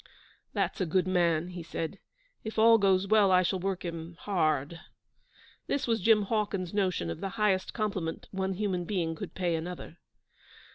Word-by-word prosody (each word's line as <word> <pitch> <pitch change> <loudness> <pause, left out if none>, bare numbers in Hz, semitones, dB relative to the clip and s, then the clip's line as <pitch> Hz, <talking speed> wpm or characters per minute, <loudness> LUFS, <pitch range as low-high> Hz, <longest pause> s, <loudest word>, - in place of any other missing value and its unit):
'That's - - -1
a 185 - +1
good 185 +2 +1
man,' 175 -2 +2
he 180 -1 -7
said. 165 +3 -5 0.4
'If 220 0 -6
all 225 +1 +7
goes 195 -1 +3
well 210 -2 +5
I 185 0 +5
shall 185 +1 0
work 185 0 -2
him 165 0 -6
hard.' 155 -5 0 0.9
This 280 - 0
was 225 -3 0
Jim 215 +1 +5
Hawkins's 200 -4 -1
notion 185 - 0
of - - -7
the 195 - -2
highest 200 -3 +1
compliment 195 -7 -3
one 190 0 -1
human 185 -3 -1
being 170 -4 -1
could 160 - -8
pay 180 -2 0
another. 170 0 -5
185 Hz, 165 wpm, -29 LUFS, 170-205 Hz, 0.9 s, all